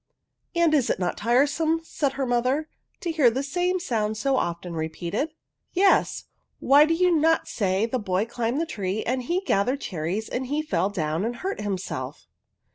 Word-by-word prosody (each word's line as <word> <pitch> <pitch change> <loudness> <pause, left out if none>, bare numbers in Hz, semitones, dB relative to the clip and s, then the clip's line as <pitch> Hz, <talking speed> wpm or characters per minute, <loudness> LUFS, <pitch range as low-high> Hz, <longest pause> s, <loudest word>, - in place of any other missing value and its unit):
" - - -48
And 340 -2 +3
is 280 -6 +3
it - - +1
not 180 -1 -1
tiresome," 285 +8 +2
said 285 -4 -1
her 270 0 -2
mo 245 -1 +2
ther, 275 +5 0 0.2
" - - -46
to 345 - -1
hear 300 -7 +5
the 260 +4 -2
same 355 +6 0
sound 220 - -1
so 270 +5 +1
often 170 -5 -2
re* 160 -1 -2
peated? 175 - -2 0.2
" - - -57
" - - -52
Yes; 385 +1 +3 0.4
why 285 +2 +6
do 330 +1 +1
you 360 0 +3
not 325 +1 +3
say 195 0 0
the 250 +2 -2
boy 190 -1 0
climbed 235 +3 -2
up 330 - -1
the - - -7
tree, 200 0 -2
and 255 +2 -1
he 345 +9 -1
gathered 255 - +1
cherries, 180 +5 -3
and 255 +1 -3
he 295 +3 -1
fell 190 - 0
down 160 -3 -2
and 235 +2 -2
hurt 380 - -4
himself?" 195 -3 -4
250 Hz, 210 wpm, -25 LUFS, 200-310 Hz, 0.4 s, why